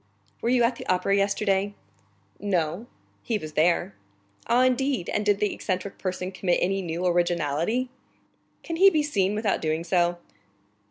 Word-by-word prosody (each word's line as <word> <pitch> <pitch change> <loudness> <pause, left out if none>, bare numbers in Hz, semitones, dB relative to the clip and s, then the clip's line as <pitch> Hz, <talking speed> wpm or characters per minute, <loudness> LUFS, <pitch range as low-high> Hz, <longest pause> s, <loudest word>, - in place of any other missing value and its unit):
"Were 235 - 0
you 245 -1 +3
at 235 +1 +1
the - - -8
Opera 185 +2 +2
yesterday?" 200 0 +1 0.6
"No." 185 +1 -1 0.3
"He 225 - -1
was 155 -6 -8
there." 160 -8 +2 0.5
"Ah, 240 +2 +4
indeed? 255 -5 +1
And 210 - 0
did 205 -1 +2
the 210 - 0
eccentric 185 0 -4
person 185 0 -3
commit 185 -1 0
any 195 +2 0
new 170 0 -3
originality?" 175 - +1 0.8
"Can 330 - -4
he 390 +3 +8
be 310 -5 +1
seen 205 -9 0
without 215 -1 0
doing 155 +1 -1
so? 175 0 +1
195 Hz, 155 wpm, -26 LUFS, 175-230 Hz, 0.8 s, he